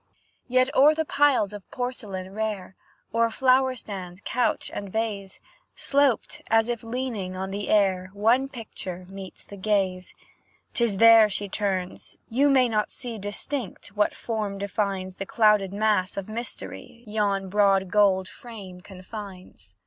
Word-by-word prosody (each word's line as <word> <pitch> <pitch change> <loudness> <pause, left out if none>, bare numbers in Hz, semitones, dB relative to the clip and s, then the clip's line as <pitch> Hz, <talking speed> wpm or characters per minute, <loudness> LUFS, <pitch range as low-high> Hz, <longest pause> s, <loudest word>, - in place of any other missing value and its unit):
Yet, 255 +3 +2
o'er 295 +3 +6
the 320 0 -1
piles 280 -9 +3
of 205 -2 -10
porcelain 205 -7 -5
rare, 210 -3 -3 0.4
O'er 230 0 +3
flower 260 +2 +3
stand, 190 -5 -8
couch, 250 0 0
and 200 -2 -5
vase, 205 -3 -3 0.4
Sloped, 280 -5 +1
as 225 +1 +3
if 235 -2 -2
leaning 230 -6 -4
on 190 +1 -4
the 200 +1 -4
air, 190 -3 +2
One 235 +6 +2
picture 190 -7 -7
meets 195 -1 -9
the 200 - -11
gaze. 190 -2 -1 0.6
'Tis 235 -6 +1
there 225 0 +8
she 205 0 -2
turns; 190 -2 -3
you 275 +5 +3
may 260 -2 +5
not 215 -2 0
see 235 -4 -6
Distinct, 205 +3 -4
what 210 +1 0
form 215 -3 -3
defines 195 -2 -2
The 195 - -5
clouded 210 -4 +3
mass 205 -3 +1
of 195 - -4
mystery 235 +1 -6
Yon 205 -2 0
broad 195 -2 +3
gold 195 -3 +3
frame 200 -6 -10
confines. 185 - -10
210 Hz, 140 wpm, -25 LUFS, 190-230 Hz, 0.6 s, there